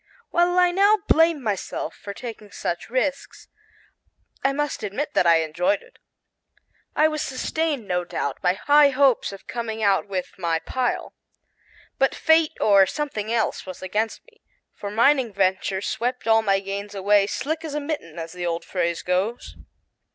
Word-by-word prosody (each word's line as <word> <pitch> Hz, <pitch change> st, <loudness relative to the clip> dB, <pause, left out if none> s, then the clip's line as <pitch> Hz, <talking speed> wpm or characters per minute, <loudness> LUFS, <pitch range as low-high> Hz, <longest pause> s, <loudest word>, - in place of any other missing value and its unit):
While 350 Hz, +1 st, +2 dB
I 360 Hz, -1 st, +5 dB
now 400 Hz, +4 st, +4 dB
blame 325 Hz, -3 st, +4 dB
myself 205 Hz, -4 st, -3 dB
for 200 Hz, -, -8 dB
taking 215 Hz, -1 st, -9 dB
such 175 Hz, +4 st, -4 dB
risks, 275 Hz, +3 st, -2 dB, 0.9 s
I 270 Hz, -, +3 dB
must 295 Hz, -1 st, -2 dB
admit 235 Hz, +9 st, -3 dB
that 175 Hz, -, +3 dB
I 165 Hz, -1 st, +5 dB
enjoyed 270 Hz, -, 0 dB
it. -, -, -22 dB, 1.0 s
I 310 Hz, -, +5 dB
was 305 Hz, -1 st, -2 dB
sustained, 280 Hz, -2 st, -2 dB
no 180 Hz, -1 st, 0 dB
doubt, 140 Hz, -5 st, -4 dB
by 180 Hz, -, +2 dB
high 290 Hz, +7 st, +5 dB
hopes 270 Hz, -5 st, +2 dB
of 195 Hz, -, -11 dB
coming 225 Hz, -2 st, -4 dB
out 200 Hz, 0 st, +2 dB
with 190 Hz, -1 st, -5 dB
my 170 Hz, -2 st, +1 dB
"pile." 245 Hz, +9 st, -2 dB, 0.9 s
But 270 Hz, -, +2 dB
fate 320 Hz, -1 st, +3 dB
or 200 Hz, -2 st, +5 dB
something 225 Hz, -7 st, -3 dB
else 225 Hz, -4 st, -1 dB
was 185 Hz, 0 st, -8 dB
against 215 Hz, +4 st, -2 dB
me, 455 Hz, -2 st, -25 dB, 0.3 s
for 200 Hz, -, -6 dB
mining 235 Hz, +3 st, +3 dB
ventures 190 Hz, 0 st, 0 dB
swept 245 Hz, +2 st, -2 dB
all 225 Hz, 0 st, +5 dB
my 195 Hz, -2 st, +1 dB
gains 200 Hz, +1 st, -5 dB
away 200 Hz, +1 st, +3 dB
"slick 315 Hz, +8 st, -3 dB
as 305 Hz, -2 st, -5 dB
a -, -, 0 dB
mitten," 285 Hz, -, -5 dB
as 165 Hz, 0 st, -6 dB
the 180 Hz, -1 st, -6 dB
old 170 Hz, 0 st, -3 dB
phrase 170 Hz, -2 st, -2 dB
goes. 190 Hz, +6 st, -2 dB
225 Hz, 165 wpm, -23 LUFS, 195-290 Hz, 1.0 s, I